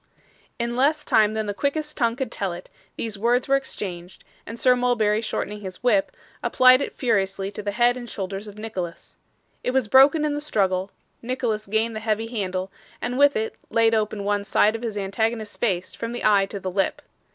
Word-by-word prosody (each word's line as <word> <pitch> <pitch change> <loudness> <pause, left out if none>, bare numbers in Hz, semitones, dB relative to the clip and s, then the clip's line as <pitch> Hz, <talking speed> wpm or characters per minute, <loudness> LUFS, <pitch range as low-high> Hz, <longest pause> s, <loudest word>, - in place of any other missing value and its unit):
In 235 0 -2
less 300 +4 +2
time 215 0 +3
than 220 0 -1
the 205 - -2
quickest 300 +6 -2
tongue 235 -3 +1
could 265 0 -4
tell 195 -3 -2
it, 175 +1 -10 0.2
these 215 -3 -4
words 240 +3 +2
were 275 - +4
exchanged, 190 -9 -5 0.2
and 230 +2 -7
Sir 255 -1 +5
Mulberry 225 -4 +2
shortening 210 -2 -3
his 190 +2 -8
whip, 210 -6 +3 0.3
applied 255 +1 +5
it - - -4
furiously 195 -5 0
to 205 - -6
the 205 - -3
head 240 +2 +3
and 240 -1 -8
shoulders 195 +1 -5
of 205 0 -11
Nicholas. 190 -6 -6 0.5
It - - 0
was 255 -3 +1
broken 275 +6 +6
in 295 - 0
the 290 - -3
struggle; 190 -9 0 0.3
Nicholas 235 -4 -2
gained 220 +2 0
the - - -3
heavy 220 0 -1
handle, 190 -5 -3 0.3
and 245 +1 -3
with 285 +1 +5
it 220 0 -1 0.2
laid 230 0 +3
open 215 -2 0
one 205 0 0
side 210 +1 +3
of 225 - -5
his 225 -3 -4
antagonist's 215 +2 -2
face 185 -6 -1
from 230 +1 -5
the 240 - -4
eye 200 -2 +4
to 200 - -6
the 185 -1 -4
lip. 195 +1 -1
220 Hz, 200 wpm, -24 LUFS, 200-245 Hz, 0.5 s, broken